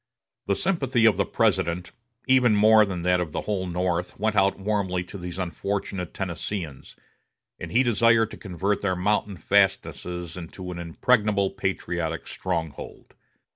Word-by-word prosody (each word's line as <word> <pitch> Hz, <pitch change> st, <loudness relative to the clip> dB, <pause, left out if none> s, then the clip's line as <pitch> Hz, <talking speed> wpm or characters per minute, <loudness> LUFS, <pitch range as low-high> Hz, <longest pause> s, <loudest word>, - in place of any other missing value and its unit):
The 100 Hz, -, +2 dB
sympathy 135 Hz, -, +1 dB
of 110 Hz, -5 st, +5 dB
the 100 Hz, -3 st, +1 dB
President, 85 Hz, +1 st, 0 dB, 0.4 s
even 125 Hz, -4 st, +5 dB
more 110 Hz, +1 st, +6 dB
than 90 Hz, -4 st, -4 dB
that 90 Hz, 0 st, +3 dB
of 85 Hz, -4 st, -3 dB
the -, -, -2 dB
whole 95 Hz, -3 st, -2 dB
North, 90 Hz, 0 st, -2 dB
went 110 Hz, +1 st, 0 dB
out 100 Hz, -1 st, +3 dB
warmly 95 Hz, -3 st, -1 dB
to 90 Hz, -, -12 dB
these 90 Hz, 0 st, -6 dB
unfortunate 95 Hz, 0 st, -3 dB
Tennesseeans, 85 Hz, -4 st, -5 dB, 0.6 s
and -, -, -7 dB
he 125 Hz, +3 st, +4 dB
desired 115 Hz, -1 st, +3 dB
to -, -, -8 dB
convert 95 Hz, +1 st, -2 dB
their 95 Hz, -2 st, 0 dB
mountain 100 Hz, +1 st, 0 dB
fastnesses 90 Hz, -3 st, 0 dB
into 90 Hz, +1 st, -7 dB
an 85 Hz, -, -6 dB
impregnable 100 Hz, +3 st, +1 dB
patriotic 85 Hz, -4 st, -3 dB
stronghold. 80 Hz, -5 st, -5 dB
95 Hz, 145 wpm, -25 LUFS, 90-105 Hz, 0.6 s, more